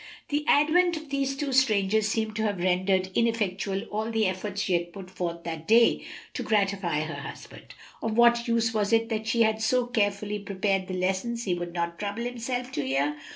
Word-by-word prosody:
The 295 +1 0
advent 335 +4 +4
of 310 -2 -10
these 275 -1 -1
two 280 -1 -2
strangers 215 -5 +3
seemed 220 -1 -1
to - - 0
have 210 -2 0
rendered 185 +1 +1
ineffectual 200 -4 0
all 215 +2 -2
the 225 -1 +1
efforts 195 +2 -2
she 190 - 0
had 175 0 0
put 185 0 -10
forth 170 -2 -4
that 160 -1 -6
day 230 +1 +5 0.3
to - - -4
gratify 195 -7 +1
her 155 +1 -4
husband; - - -10 0.3
of 225 0 -2
what 235 0 +5
use 230 -1 +1
was 210 -1 0
it 225 0 +3
that 220 -1 -2
she 230 0 +3
had 220 0 +1
so 245 +3 +2
carefully 210 -3 -1
prepared 195 -1 -1
the 185 - -4
lessons 190 +6 -1
he 185 - 0
would 175 -1 -4
not 170 -1 -3
trouble 205 +3 -3
himself 245 +1 -3
to - - -2
hear? 140 +3 0
210 Hz, 200 wpm, -27 LUFS, 185-235 Hz, 0.3 s, day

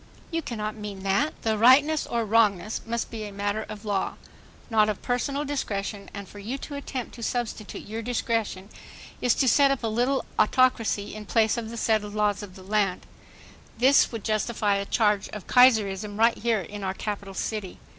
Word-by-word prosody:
You 330 0 -1
cannot 215 -6 -4
mean 205 -3 -7
that. 200 +11 0
The 220 -1 0
rightness 285 +6 +5
or 235 -1 -1
wrongness 215 -2 +2
must 235 0 -2
be 225 -2 -5
a 205 - -7
matter 205 +2 -2
of 215 0 -8
law, 200 -2 -1 0.5
not 215 -2 +3
of 210 - -4
personal 275 +4 -1
discretion, 205 -8 -3
and 200 -1 -8
for 205 - -12
you 230 +7 -4
to 290 - -8
attempt 275 -3 -5
to 235 - -10
substitute 230 -3 -3
your 220 +2 -5
discretion 225 -4 -2 0.5
is 245 - +3
to 265 - +2
set 280 +2 +5
up 275 -3 -1
a - - +1
little 245 +5 0
autocracy 225 -3 +2
m 210 -1 -8
place 220 -2 +3
of 230 -2 -4
the 235 - -7
settled 215 -2 0
laws 210 -1 +1
of 195 -3 -10
the 190 - -12
land. 200 -2 0 0.7
This 265 +4 +5
would 225 -4 -6
justify 215 -2 0
a 200 - -2
charge 210 -3 +2
of 210 -4 -8
"Kaiserism" 210 -5 +4
right 230 +1 +4
here 225 -2 0
in 205 +4 -8
our 190 0 -2
capital 200 -2 -5
city. 210 -4 -4
215 Hz, 185 wpm, -26 LUFS, 205-240 Hz, 0.7 s, rightness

